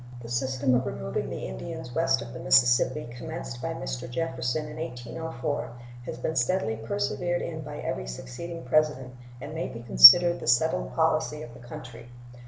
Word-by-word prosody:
The 115 Hz, -, -9 dB
system 130 Hz, +1 st, 0 dB
of 125 Hz, +1 st, +1 dB
removing 65 Hz, 0 st, -4 dB
the -, -, -6 dB
Indians 65 Hz, -, -7 dB
west 130 Hz, -6 st, +1 dB
of 120 Hz, 0 st, -10 dB
the 125 Hz, -, -8 dB
Mississippi, 125 Hz, +2 st, +3 dB
commenced 160 Hz, -4 st, -7 dB
by 165 Hz, +4 st, -4 dB
Mr. 125 Hz, -2 st, -5 dB
Jefferson 130 Hz, +1 st, -2 dB
in 150 Hz, -, -9 dB
1804, 145 Hz, -2 st, -5 dB, 0.4 s
has -, -, -5 dB
been 160 Hz, -, -3 dB
steadily 125 Hz, -3 st, 0 dB
persevered 110 Hz, -, -2 dB
in 160 Hz, -2 st, -5 dB
by 150 Hz, 0 st, -8 dB
every 65 Hz, -, -4 dB
succeeding 145 Hz, -, -8 dB
President, 135 Hz, -2 st, 0 dB, 0.3 s
and 145 Hz, +4 st, -8 dB
may 160 Hz, -, -3 dB
be 115 Hz, 0 st, -9 dB
considered 120 Hz, -, +9 dB
the -, -, -8 dB
settled 120 Hz, +7 st, +1 dB
policy 155 Hz, -1 st, 0 dB
of 120 Hz, -, -11 dB
the -, -, -13 dB
country. 120 Hz, -1 st, -11 dB
130 Hz, 170 wpm, -26 LUFS, 120-155 Hz, 0.4 s, considered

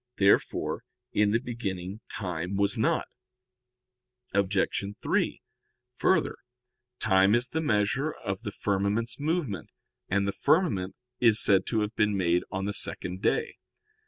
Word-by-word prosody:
Therefore 100 Hz, 0 st, +2 dB, 0.3 s
in 105 Hz, 0 st, +3 dB
the 110 Hz, -, +3 dB
beginning 100 Hz, -6 st, -5 dB
time 90 Hz, -1 st, -3 dB
was 100 Hz, 0 st, +2 dB
not. -, -, +1 dB, 1.3 s
Obj. 100 Hz, 0 st, +1 dB, 0.4 s
3: -, -, 0 dB, 0.5 s
Further, 165 Hz, +6 st, +1 dB, 0.6 s
time 95 Hz, -1 st, +4 dB
is 120 Hz, +1 st, +1 dB
the 160 Hz, -, -1 dB
measure 135 Hz, +3 st, +1 dB
of 95 Hz, -7 st, -5 dB
the 105 Hz, -4 st, -5 dB
firmament's 105 Hz, +5 st, -1 dB
movement; 145 Hz, -, -2 dB, 0.4 s
and 100 Hz, +1 st, +1 dB
the -, -, +1 dB
firmament 100 Hz, -, +1 dB, 0.2 s
is 115 Hz, -3 st, +5 dB
said 100 Hz, -2 st, +4 dB
to 110 Hz, -2 st, +1 dB
have 105 Hz, +1 st, -3 dB
been 105 Hz, -1 st, +2 dB
made 90 Hz, -1 st, +2 dB
on 95 Hz, +1 st, -3 dB
the 100 Hz, -, -2 dB
second 90 Hz, -1 st, -3 dB
day. 455 Hz, -, 0 dB
100 Hz, 130 wpm, -28 LUFS, 95-120 Hz, 1.3 s, is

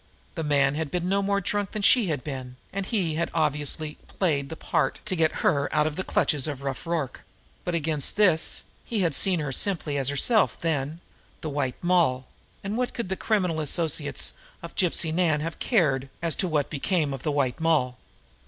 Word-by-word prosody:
The 165 Hz, -, -3 dB
man 140 Hz, -2 st, +3 dB
had 155 Hz, 0 st, -2 dB
been 175 Hz, +3 st, -1 dB
no 200 Hz, +2 st, +2 dB
more 200 Hz, 0 st, +1 dB
drunk 205 Hz, +1 st, -2 dB
than 210 Hz, -2 st, -3 dB
she 235 Hz, -1 st, +5 dB
had 150 Hz, -6 st, -1 dB
been, 130 Hz, -3 st, -6 dB, 0.2 s
and 195 Hz, 0 st, -3 dB
he 185 Hz, -9 st, 0 dB
had 165 Hz, +2 st, -1 dB
obviously 150 Hz, 0 st, 0 dB
only -, -, -22 dB
played 145 Hz, -7 st, +1 dB
the 160 Hz, -, -5 dB
part -, -, 0 dB
to 200 Hz, -3 st, -1 dB
get 160 Hz, -2 st, +3 dB
her 145 Hz, -9 st, +3 dB
out 150 Hz, 0 st, +3 dB
of 155 Hz, -1 st, -1 dB
the 185 Hz, -, -2 dB
clutches 150 Hz, -6 st, +1 dB
of 140 Hz, -2 st, -5 dB
Rough 135 Hz, +3 st, -4 dB
Rorke; 160 Hz, -7 st, -2 dB, 0.4 s
but, 175 Hz, -, -1 dB
against 155 Hz, -3 st, 0 dB
this, 180 Hz, -6 st, +3 dB, 0.2 s
he 220 Hz, -4 st, -1 dB
had 170 Hz, -4 st, +2 dB
seen 185 Hz, +3 st, +3 dB
her 145 Hz, -2 st, -2 dB
simply 155 Hz, -2 st, 0 dB
as 135 Hz, -1 st, 0 dB
herself 205 Hz, -, +2 dB
then, 155 Hz, 0 st, -1 dB, 0.4 s
the 155 Hz, -, -3 dB
White 140 Hz, -3 st, -1 dB
Moll, 170 Hz, -8 st, +3 dB, 0.4 s
and 200 Hz, +3 st, -2 dB
what 250 Hz, -, -1 dB
could 235 Hz, -6 st, -3 dB
the 190 Hz, -, 0 dB
criminal 185 Hz, -7 st, 0 dB
associates 155 Hz, -1 st, 0 dB, 0.3 s
of -, -, -7 dB
Gypsy 170 Hz, -3 st, +1 dB
Nan 160 Hz, -4 st, +2 dB
have 165 Hz, +1 st, -4 dB
cared 140 Hz, -, +2 dB
as 170 Hz, -2 st, 0 dB
to 185 Hz, -, +1 dB
what 150 Hz, -4 st, 0 dB
became 155 Hz, -1 st, 0 dB
of 135 Hz, -, -6 dB
the 150 Hz, -, -1 dB
White 135 Hz, -4 st, 0 dB
Moll? 155 Hz, -6 st, +2 dB
160 Hz, 200 wpm, -26 LUFS, 145-180 Hz, 0.4 s, she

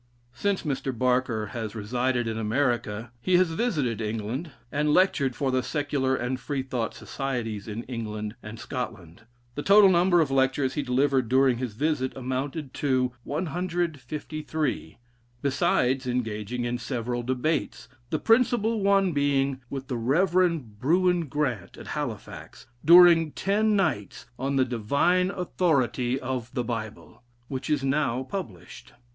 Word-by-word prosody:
Since 200 Hz, +10 st, -1 dB
Mr. 135 Hz, -2 st, -2 dB
Baker 125 Hz, -3 st, 0 dB
has 115 Hz, -2 st, -4 dB
resided 120 Hz, +3 st, -1 dB
in 110 Hz, -, -2 dB
America, 115 Hz, -1 st, -1 dB
he 185 Hz, +4 st, +3 dB
has 180 Hz, -2 st, +3 dB
visited 150 Hz, -, -1 dB
England, 110 Hz, +8 st, -3 dB, 0.2 s
and 150 Hz, +1 st, +1 dB
lectured 150 Hz, -9 st, +3 dB
for 135 Hz, -2 st, 0 dB
the 130 Hz, 0 st, +2 dB
Secular 145 Hz, -2 st, -1 dB
and 125 Hz, +1 st, -2 dB
Freethought 130 Hz, -3 st, -3 dB
Societies 120 Hz, -7 st, -4 dB
in 110 Hz, +2 st, -5 dB
England 110 Hz, -3 st, -5 dB
and 110 Hz, +2 st, -9 dB
Scotland; 110 Hz, -, -6 dB, 0.3 s
the 145 Hz, -, -4 dB
total 200 Hz, +2 st, +7 dB
number 175 Hz, 0 st, +4 dB
of 150 Hz, -4 st, +2 dB
lectures 135 Hz, 0 st, +2 dB
he 150 Hz, -, -1 dB
delivered 130 Hz, -1 st, +1 dB
during 130 Hz, -1 st, +3 dB
his 125 Hz, -4 st, -3 dB
visit 140 Hz, -1 st, -1 dB
amounted 130 Hz, +3 st, -4 dB
to 130 Hz, -3 st, +1 dB
153, 155 Hz, -3 st, -3 dB, 0.5 s
besides 130 Hz, -1 st, +1 dB
engaging 120 Hz, -1 st, -2 dB
in 120 Hz, 0 st, -2 dB
several 120 Hz, -1 st, -3 dB
debates, 130 Hz, +1 st, -2 dB, 0.2 s
the 155 Hz, -, 0 dB
principal 225 Hz, 0 st, +2 dB
one 195 Hz, -1 st, +3 dB
being 140 Hz, -2 st, +1 dB
with 135 Hz, -1 st, -5 dB
the 125 Hz, -, -2 dB
Rey. 175 Hz, +8 st, +2 dB, 0.2 s
Brewin 175 Hz, +4 st, +2 dB
Grant, 130 Hz, -8 st, -2 dB
at -, -, -10 dB
Halifax, -, -, -6 dB, 0.2 s
during 170 Hz, -1 st, +7 dB
ten 210 Hz, +2 st, +1 dB
nights, 155 Hz, -, -1 dB
on 135 Hz, +2 st, -1 dB
the 130 Hz, -1 st, +3 dB
"Divine 140 Hz, -, +1 dB
Authority 140 Hz, -9 st, 0 dB
of 130 Hz, -2 st, -4 dB
the 125 Hz, -, 0 dB
Bible," 115 Hz, -2 st, -6 dB, 0.3 s
which 130 Hz, +1 st, -4 dB
is 150 Hz, -3 st, +1 dB
now 135 Hz, -2 st, 0 dB
published. 130 Hz, -, -8 dB
130 Hz, 135 wpm, -26 LUFS, 120-160 Hz, 0.5 s, total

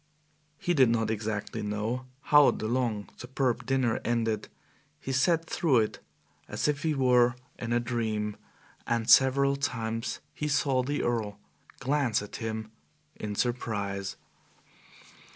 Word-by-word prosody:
He 175 Hz, -, 0 dB
did 130 Hz, -7 st, +5 dB
not 115 Hz, -1 st, +1 dB
exactly 110 Hz, -1 st, -3 dB
know 110 Hz, +5 st, -2 dB
how 145 Hz, -1 st, +6 dB
the 110 Hz, -, -2 dB
long, 115 Hz, -4 st, -1 dB
superb 130 Hz, -1 st, -1 dB
dinner 130 Hz, -4 st, +1 dB
ended. 115 Hz, -2 st, 0 dB, 0.5 s
He 135 Hz, -, -5 dB
sat 165 Hz, +6 st, +2 dB
through 150 Hz, -7 st, +2 dB
it 110 Hz, -1 st, 0 dB, 0.5 s
as -, -, -1 dB
if 145 Hz, -1 st, 0 dB
he 155 Hz, -1 st, 0 dB
were 125 Hz, -2 st, +4 dB, 0.2 s
in 120 Hz, -1 st, -4 dB
a 120 Hz, -, +3 dB
dream, 110 Hz, -3 st, -2 dB, 0.5 s
and 115 Hz, -1 st, 0 dB
several 140 Hz, +1 st, +6 dB
times 115 Hz, -4 st, -2 dB
he 150 Hz, -, -3 dB
saw 140 Hz, -3 st, +2 dB
the 145 Hz, +3 st, -2 dB
Earl 110 Hz, -4 st, -1 dB, 0.4 s
glance 135 Hz, -5 st, +1 dB
at 105 Hz, -, -8 dB
him 110 Hz, -1 st, -4 dB, 0.4 s
in 105 Hz, -1 st, -5 dB
surprise. 100 Hz, -5 st, -2 dB
120 Hz, 135 wpm, -29 LUFS, 110-135 Hz, 0.5 s, how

